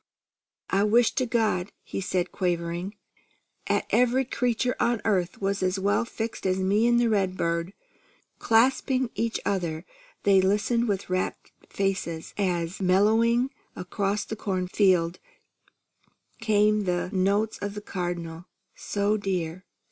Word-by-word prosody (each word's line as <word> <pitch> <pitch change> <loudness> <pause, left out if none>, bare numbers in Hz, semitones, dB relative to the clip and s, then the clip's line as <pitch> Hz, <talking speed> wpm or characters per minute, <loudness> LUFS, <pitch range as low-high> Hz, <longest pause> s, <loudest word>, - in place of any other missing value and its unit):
"I 195 +1 +3
wish 225 +3 +4
to 255 - 0
God," 220 -5 0
he - - -5
said 185 -1 -1
quaveringly, 175 +2 -2 0.7
"'at - - +1
every 250 +2 +3
creature 250 0 0
on 240 -2 +2
earth 185 -5 0
was 195 0 -1
as 185 +1 +1
well 200 +4 +1
fixed 225 -3 -4
as 185 0 +1
me 200 +4 +2
an' 240 0 +4
the 240 0 +3
redbird!" 185 -4 0 0.7
Clasping 255 +2 +2
each 230 0 -1
other, 170 -4 -2 0.4
they 195 -1 +5
listened 210 +5 +1
with 195 -3 -2
rapt 185 0 -2 0.2
faces, 190 -4 -2
as, 180 -2 -1
mellowing 225 +7 +3 0.2
across 195 +3 -2
the 220 - -5
corn 185 -4 -2
field, 180 -3 +2 1.2
came 210 -1 +2
the 180 0 -1
notes 200 +3 +1
of 205 0 -4
the - - -4
Cardinal: 175 -3 -5 0.3
"So 205 +1 0
dear! 185 -3 -3
195 Hz, 130 wpm, -26 LUFS, 180-220 Hz, 1.2 s, they